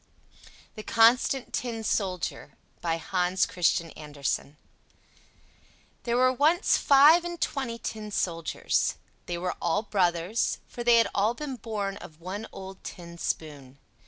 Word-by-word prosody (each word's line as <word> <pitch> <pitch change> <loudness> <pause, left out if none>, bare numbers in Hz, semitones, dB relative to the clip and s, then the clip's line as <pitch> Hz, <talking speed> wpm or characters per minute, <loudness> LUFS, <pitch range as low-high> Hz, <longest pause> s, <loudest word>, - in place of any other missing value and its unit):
THE 215 - -8
CONSTANT 235 +4 +3
TIN 230 -3 -3
SOLDIER 185 -5 -2 0.2
By 165 -1 0
Hans 180 +2 0
Christian 170 -2 0
Andersen 145 -1 -4 1.5
There 235 0 +1
were 255 +1 +4
once 310 - +3
five 295 +5 +6
and 345 -1 -5
twenty 260 -5 -2
tin 215 -2 -6
soldiers; 165 -5 -1 0.3
they 175 - -3
were 180 +1 -2
all 175 +5 +1
brothers, 180 0 0
for 240 - -7
they 240 -1 +6
had 230 - +4
all 210 +4 +1
been 285 -1 -5
born 210 -4 -4
of 155 0 -12
one 190 +6 -6
old 190 0 -10
tin 170 -1 -9
spoon. 140 -6 -4
200 Hz, 130 wpm, -27 LUFS, 170-240 Hz, 1.5 s, five